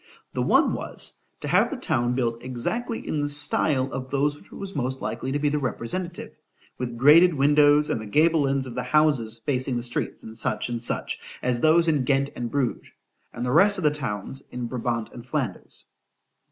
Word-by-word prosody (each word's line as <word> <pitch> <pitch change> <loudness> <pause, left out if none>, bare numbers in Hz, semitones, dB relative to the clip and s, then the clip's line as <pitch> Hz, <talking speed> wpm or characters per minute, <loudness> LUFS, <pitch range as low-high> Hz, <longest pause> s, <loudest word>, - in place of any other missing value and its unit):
The - - -1
one - - +3
was, - - -4 0.3
to - - -4
have - - +3
the - - -4
town 120 +1 0
built 115 -2 -1
exactly 225 - -3
in 150 - -1
the 145 - -1
style 145 -1 +2
of 130 0 -5
those 145 +2 +1
of 145 - -15
which - - -19
it - - -11
was 195 -2 -7
most 130 -1 -2
likely 130 - -4
to 145 - 0
be 145 0 0
the 150 +1 0
representative:——with 130 - -6
grated 155 +7 +6
windows, 145 +1 +5
and 110 - -1
the 110 - -7
gable 155 +4 +3
ends 135 -1 0
of 125 - -7
the - - -2
houses, 145 -8 +2
facing 130 -2 0
the 120 - -3
streets, 120 0 -3 0.2
&c. 120 +1 -1
&c.—as 120 +1 -3
those 165 +2 +5
in 150 -5 +2
Ghent 140 +1 +1
and 120 -1 -4
Bruges, 135 -3 -2 0.4
and 120 - -5
the 125 - -1
rest 200 +8 +5
of 185 - -4
the 150 - +4
towns 130 -2 -4
in 125 -1 -5
Brabant 120 -2 -3
and 120 - -9
_Flanders. 130 -7 -4
135 Hz, 195 wpm, -25 LUFS, 120-150 Hz, 0.4 s, grated